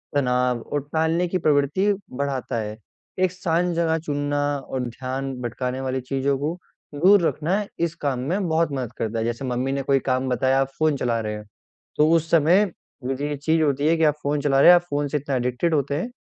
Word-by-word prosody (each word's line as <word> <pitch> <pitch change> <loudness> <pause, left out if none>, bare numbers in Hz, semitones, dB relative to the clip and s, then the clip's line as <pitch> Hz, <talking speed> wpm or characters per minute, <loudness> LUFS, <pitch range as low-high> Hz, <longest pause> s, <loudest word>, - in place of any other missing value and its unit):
तनाव 125 -2 +1
और 145 - -3
टालने 160 +2 +1
की 185 - -1
प्रवृत्ति 155 +5 +2 0.2
बढ़ाता 135 -2 -3
है। 105 0 -6 0.4
एक 185 -1 +2
शांत 180 -1 0
जगह 165 -1 +1
चुनना 145 0 -1 0.3
और 130 - -2
ध्यान 130 +3 -4
भटकाने 125 +2 -3
वाली 130 0 -2
चीज़ों 135 +2 -1
को 155 +5 -2 0.4
दूर 190 +6 +5
रखना 190 +7 -1
इस 170 -1 -1
काम 135 -3 0
में 175 +9 -1
बहुत 160 0 +1
मदद 130 -4 -3
करता 115 0 -2
है। 110 - -1
जैसे, 120 +3 -3
मम्मी 125 +1 -1
ने 140 0 -1
कोई 135 0 +2
काम 130 +1 0
बताया, 130 +2 +2
आप 135 - 0
फ़ोन 155 -2 +3
चला 120 -3 0
रहे 105 -1 -3
हैं, 105 0 -9 0.5
तो 150 +1 +4
उस 165 -1 +2
समय 170 +6 +5 0.4
वो 130 +2 -1
जो 140 +2 -4
ये 145 0 -3
चीज़ 160 +3 +1
होती 145 0 +1
है 165 +1 +3
कि 160 - +1
आप 150 -2 +4
फ़ोन 145 +1 0
चला 135 -1 +2
रहे - - +8
हैं, 175 - +10
आप 175 - +3
फ़ोन 145 0 -1
से 150 - -1
इतना 140 -1 -3
एडिक्टेड 125 +7 0
होते 145 -1 0
हैं 175 +11 -2
145 Hz, 220 wpm, -23 LUFS, 130-160 Hz, 0.5 s, हैं